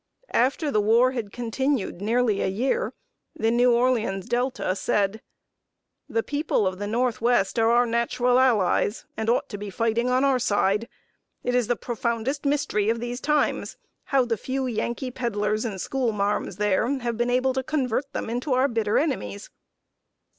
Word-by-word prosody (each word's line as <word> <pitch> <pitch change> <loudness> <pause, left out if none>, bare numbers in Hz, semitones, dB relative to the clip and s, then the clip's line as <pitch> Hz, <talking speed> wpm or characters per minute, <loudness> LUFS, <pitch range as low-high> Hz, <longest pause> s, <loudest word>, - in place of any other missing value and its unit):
After 280 +5 +1
the 215 - +2
war 230 +5 +4
had 230 -6 -4
continued 240 -4 -2
nearly 225 -1 +1
a - - +1
year, 265 - 0 0.4
The 225 +1 +1
New 245 +1 +4
Orleans 235 -6 +1
Delta 245 -6 -1
said: 205 +2 0 0.9
"The 225 - 0
people 290 -7 0
of 185 0 -2
the 205 - -3
Northwest 235 -1 +1
are 225 0 +4
our 240 +1 +4
natural 240 +2 +1
allies, 220 -4 +2
and 220 0 -2
ought 240 - +1
to 205 - -6
be 205 0 -5
fighting 230 +4 0
on 255 +1 +2
our 270 -2 +3
side. 210 0 +1 0.5
It 245 - -1
is 245 -3 +2
the 245 - +1
profoundest 240 +5 -2
mystery 275 -8 +1
of 230 +1 0
these 240 +1 -4
times 300 0 0 0.3
how 270 -2 +2
the 230 -2 -1
few 265 +5 -3
Yankee 240 +2 -2
peddlers 215 -3 -1
and 200 -4 -4
school 255 +2 -1
marms 205 -2 -1
there 210 +2 +1
have 235 -1 -2
been 240 +2 0
able 255 +1 +2
to 265 - -1
convert 270 -1 -1
them - - -4
into 245 +4 -2
our 255 +2 +3
bitter 225 -4 0
enemies." 105 - -2
235 Hz, 170 wpm, -25 LUFS, 215-255 Hz, 0.9 s, war